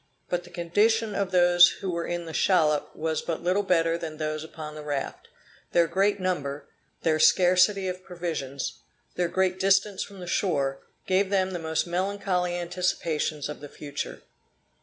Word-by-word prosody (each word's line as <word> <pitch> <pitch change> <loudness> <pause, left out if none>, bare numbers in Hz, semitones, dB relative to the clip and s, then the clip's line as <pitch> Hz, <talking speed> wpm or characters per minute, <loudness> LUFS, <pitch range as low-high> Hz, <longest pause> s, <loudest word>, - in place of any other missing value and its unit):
But 175 0 -2
the - - -13
condition 210 +6 +1
of 200 -1 -1
those 175 -1 +6
who 190 - -3
were 170 -1 -3
in 175 0 -3
the 160 - -7
shallop 155 -6 +2
was 160 0 -1
but 165 - -4
little 185 +3 +2
better 165 -3 +2
than 155 -2 -6
those 155 0 -3
upon 155 -1 -8
the 155 - -8
raft; 145 -2 -4 0.5
their 170 -1 +5
great 195 +5 +1
number, 150 -6 -2 0.4
their 155 -1 +2
scarcity 185 +3 +4
of 185 0 -5
provisions, 160 -7 -4 0.3
their 180 -1 0
great 185 0 +1
distance 195 +1 +2
from 200 -1 -7
the 180 - -7
shore, 140 -7 0 0.3
gave 190 +1 +2
them 190 -1 +1
the 175 - -4
most 160 -1 -1
melancholy 180 0 -1
anticipations 170 -4 -1
of 150 - -7
the 145 - -9
future. 145 0 -6
175 Hz, 165 wpm, -26 LUFS, 155-185 Hz, 0.5 s, those